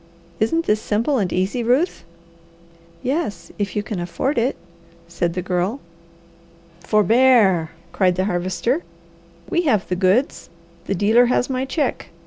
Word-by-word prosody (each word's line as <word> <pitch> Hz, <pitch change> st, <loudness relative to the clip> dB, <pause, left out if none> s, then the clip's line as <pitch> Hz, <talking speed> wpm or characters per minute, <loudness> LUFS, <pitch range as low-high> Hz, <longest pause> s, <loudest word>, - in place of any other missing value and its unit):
Isn't 330 Hz, +10 st, +1 dB
this 210 Hz, +1 st, +1 dB
simple 235 Hz, +6 st, 0 dB
and 190 Hz, -4 st, -1 dB
easy, 190 Hz, +7 st, -1 dB
Ruth?" 255 Hz, +10 st, +1 dB, 1.0 s
"Yes, 255 Hz, -, -3 dB
if 200 Hz, -2 st, -2 dB
you 210 Hz, -, -1 dB
can 210 Hz, -4 st, -5 dB
afford 235 Hz, -, -1 dB
it," 245 Hz, +4 st, 0 dB, 0.5 s
said 170 Hz, 0 st, -2 dB
the 180 Hz, -, -2 dB
Girl. 185 Hz, +7 st, -1 dB, 1.0 s
"Forbear!" 215 Hz, -4 st, +3 dB, 0.2 s
cried 185 Hz, -2 st, +2 dB
the 185 Hz, +1 st, 0 dB
Harvester. 190 Hz, -, -1 dB, 0.7 s
"We 345 Hz, -, +1 dB
have 210 Hz, -6 st, +1 dB
the 180 Hz, -, -1 dB
goods, 190 Hz, +9 st, +1 dB, 0.4 s
the 200 Hz, -, 0 dB
dealer 220 Hz, +6 st, +4 dB
has 250 Hz, +1 st, 0 dB
my 260 Hz, 0 st, -1 dB
check. 275 Hz, 0 st, -2 dB
215 Hz, 135 wpm, -21 LUFS, 185-255 Hz, 1.0 s, dealer